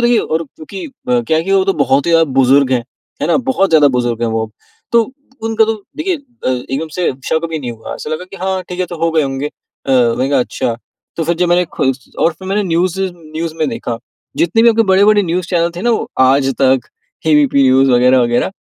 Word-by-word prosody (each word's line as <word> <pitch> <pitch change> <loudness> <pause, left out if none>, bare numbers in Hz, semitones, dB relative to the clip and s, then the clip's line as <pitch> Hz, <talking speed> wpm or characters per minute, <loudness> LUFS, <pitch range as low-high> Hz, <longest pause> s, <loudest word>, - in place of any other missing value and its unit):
देखिए 240 -1 +3
और 160 +1 -1
क्योंकि 155 +6 -10
अ, 250 -3 -2
क्या 160 -9 0
है 160 - 0
कि 195 - -1
वो 190 -1 +4
तो 195 - +2
बहुत 140 +4 +2
ही - - +2
ज़्यादा 165 0 +5 0.2
बुजुर्ग 135 +1 +4
हैं। 120 -2 0 0.4
है - - +1
ना, 170 - +3
बहुत 250 -8 0
ज़्यादा 150 -3 +6
बुजुर्ग 120 -1 -1
हैं 115 - +1
वो, 110 -1 -2 0.4
तो 235 +2 +2 0.3
उनका 225 0 +2
तो 225 - 0 0.2
देखिए 345 +3 -1
अ, 245 - -8
एकदम 135 +5 -2
से 180 - 0 0.2
शक़ 160 +1 0
भी 160 -1 -3
नहीं 125 -4 -5
हुआ। 115 -1 -8
ऐसा 150 - -7
लगा 155 +4 -3
कि 195 - -9
हाँ 190 0 -2
ठीक 180 0 -5
है, 180 - 0
तो 175 - -7
हो 165 - +2
गए 160 -1 +2
होंगे 135 +1 -2
अ, 135 -2 -7
मैंने 125 +1 +2
कहा - - +3
अच्छा, 120 -1 -2 0.4
तो 165 - -1
फिर 170 - +1
जब 175 0 +1
मैंने 175 +1 +3
खुद 135 0 +1 0.2
और 165 - +2
फिर 190 +2 -10
मैंने 205 +2 +1
न्यूज़ 180 +1 0
न्यूज़ 165 -3 -5
में 155 -3 0
देखा। 115 -1 -4 0.4
जितने 185 +7 +2
भी 235 - +6
आपके 225 0 +4
बड़े 190 +2 +5
बड़े 210 -1 +4
न्यूज़ 175 0 -2
चैनल 170 -1 +1
थे 180 - -5
ना 240 - +2
वो, 225 - -1
आज 135 +1 +4
तक, 130 -1 +4 0.5
ए - - +4
बी 295 -1 +5
पी 140 - +4
न्यूज़ 135 +1 +4
वग़ैरह-वग़ैरह 125 +1 +3
165 Hz, 240 wpm, -15 LUFS, 135-195 Hz, 0.5 s, ज़्यादा